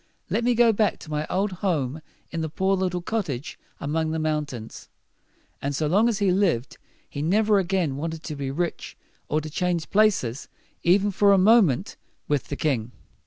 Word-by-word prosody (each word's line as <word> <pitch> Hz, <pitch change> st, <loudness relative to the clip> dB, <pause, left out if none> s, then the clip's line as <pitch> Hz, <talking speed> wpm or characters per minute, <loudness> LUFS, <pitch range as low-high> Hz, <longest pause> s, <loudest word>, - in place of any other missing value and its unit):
Let 235 Hz, -, +1 dB
me 245 Hz, 0 st, +2 dB
go 235 Hz, -1 st, +5 dB
back 210 Hz, -2 st, +1 dB
to 155 Hz, -, -10 dB
my 150 Hz, 0 st, -2 dB
old 195 Hz, +2 st, 0 dB
home 160 Hz, -6 st, -2 dB, 0.3 s
in 165 Hz, -, -3 dB
the 160 Hz, -, -2 dB
poor 190 Hz, +5 st, +1 dB
little 180 Hz, -2 st, -2 dB
cot 220 Hz, 0 st, -1 dB
tage 135 Hz, -2 st, -6 dB, 0.2 s
among 155 Hz, +2 st, -1 dB
the 160 Hz, -, -2 dB
mountains." 150 Hz, -7 st, -4 dB, 0.7 s
And 140 Hz, +1 st, -2 dB
so 155 Hz, -, 0 dB
long 205 Hz, +10 st, +3 dB
as 225 Hz, -, -1 dB
he 200 Hz, -2 st, +2 dB
lived, 180 Hz, -, 0 dB, 0.3 s
he 140 Hz, -, -6 dB
never 205 Hz, +5 st, +3 dB
again 180 Hz, -7 st, 0 dB
wanted 160 Hz, +1 st, -4 dB
to 155 Hz, -, -5 dB
be 140 Hz, -1 st, -4 dB
rich, 170 Hz, +5 st, -3 dB, 0.3 s
or 155 Hz, -, +1 dB
to 155 Hz, -, -7 dB
change 175 Hz, -1 st, -1 dB
places, 195 Hz, -, +2 dB, 0.3 s
even 195 Hz, +4 st, +3 dB
for 200 Hz, +1 st, +4 dB
a -, -, +5 dB
moment, 195 Hz, -, +4 dB, 0.3 s
with 145 Hz, -2 st, 0 dB
the 145 Hz, -, -5 dB
king. 125 Hz, -6 st, -1 dB
170 Hz, 185 wpm, -25 LUFS, 150-200 Hz, 0.7 s, go